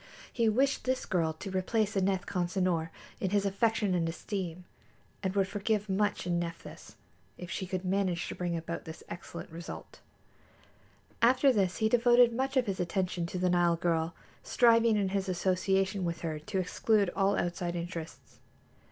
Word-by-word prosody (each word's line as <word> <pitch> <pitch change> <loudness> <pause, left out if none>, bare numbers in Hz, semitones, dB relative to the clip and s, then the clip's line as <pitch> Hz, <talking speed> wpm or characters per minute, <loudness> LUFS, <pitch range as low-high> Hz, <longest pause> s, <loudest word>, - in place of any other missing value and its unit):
He 230 -2 +2
wished 265 +6 +1
this 260 0 0
girl 165 -4 +1
to 190 +5 -7
replace 200 +3 0
Aneth 190 -1 +1
Consinor 180 -2 0 0.3
in 190 - -1
his 200 +1 +1
affection 205 0 +1
and 165 -2 +1
esteem, 180 0 -4 0.6
and 190 0 -2
would 195 -1 +2
forgive 205 +1 -1
much 205 0 0
in 175 -1 0
Nephthys 170 -1 -7 0.4
if 180 -1 -8
she 190 - -3
could 185 0 -3
manage 185 -2 0
to - - -4
bring 175 -1 -2
about 165 +1 -5
this 160 0 -9
excellent 175 0 -8
result. 170 +1 -9 1.2
After 255 +3 +5
this 190 -5 +1
he 220 - +2
devoted 240 +1 +5
much 265 +3 -1
of 255 - +3
his 195 -3 -3
attention 180 -1 -1
to 180 - -5
the 180 0 +1
Nile 175 -1 +3
girl, 165 0 0 0.3
striving 230 -2 +4
in 195 -2 +1
his 195 0 -1
association 190 +1 +1
with 170 -1 -3
her 155 -2 -3
to 155 +5 -4
exclude 200 +1 +1
all 195 0 +2
outside 175 0 -2
interests. 170 -1 -7
190 Hz, 165 wpm, -30 LUFS, 175-210 Hz, 1.2 s, After